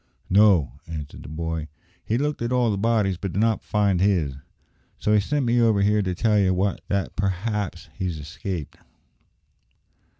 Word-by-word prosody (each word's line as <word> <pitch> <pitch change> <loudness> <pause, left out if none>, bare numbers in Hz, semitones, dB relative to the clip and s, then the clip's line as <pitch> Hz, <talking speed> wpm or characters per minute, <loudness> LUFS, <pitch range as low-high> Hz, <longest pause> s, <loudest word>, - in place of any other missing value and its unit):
"No," 95 - +4
answered 75 -3 -7
the - - -10
boy. 80 0 -3 0.4
"He 115 - 0
looked 145 +1 -1
at 120 +1 -1
all 125 -3 +2
the 100 - -1
bodies, 105 -4 +1
but 95 -2 -4
did 100 - -1
not 110 0 +2
find 100 -4 +1
his; 90 -8 +2 0.6
so 105 - +1
he 105 - +5
sent 140 +6 0
me 120 0 +3
over 110 -4 +3
here 105 +1 +3
to 95 -2 -2
tell 105 +1 +2
ye 95 -2 +3 0.4
that 100 -1 -1
p'r'aps 100 -1 -2
he's 90 -4 -3
escaped." 85 +1 -6
100 Hz, 165 wpm, -24 LUFS, 85-110 Hz, 0.6 s, he